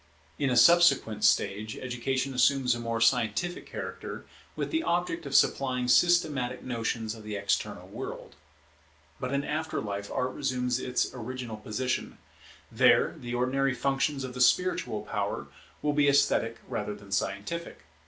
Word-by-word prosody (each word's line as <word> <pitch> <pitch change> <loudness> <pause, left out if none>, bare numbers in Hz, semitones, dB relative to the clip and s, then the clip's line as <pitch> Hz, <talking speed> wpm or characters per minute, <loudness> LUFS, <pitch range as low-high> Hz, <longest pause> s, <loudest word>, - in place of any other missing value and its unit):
In 140 -2 +1
a 125 - +1
subsequent 125 -7 +5
stage 105 +2 +2
education 130 +2 -2
assumes 125 0 +3
a 120 - -4
more 115 -1 -2
scientific 115 +9 +1
character, - - -7 0.3
with - - -3
the 320 -1 +1
object 175 - -1
of 140 - -3
supplying 130 -2 +2
systematic 135 -2 +3
notions 115 -2 -2
of 115 - -11
the 105 -1 -6
external 100 0 -2
world. - - -7 0.9
But 125 - -3
in 140 0 0
after 155 +2 -2
life 100 -1 -4
Art 130 0 -1
resumes 125 -3 -1
its 125 -1 -1
original 125 -1 -6
position. 120 +4 -3 0.5
There - - +4
the 120 0 -5
ordinary 130 +2 +1
functions 135 +2 0
of 130 -1 -6
the 125 - -4
spiritual 180 +9 +2
power - - -3 0.4
will 150 0 +1
be 145 -1 +3
esthetic 140 0 +2
rather 105 - -3
than 100 -1 -14
scientific. 100 - -3
125 Hz, 145 wpm, -28 LUFS, 115-140 Hz, 0.9 s, subsequent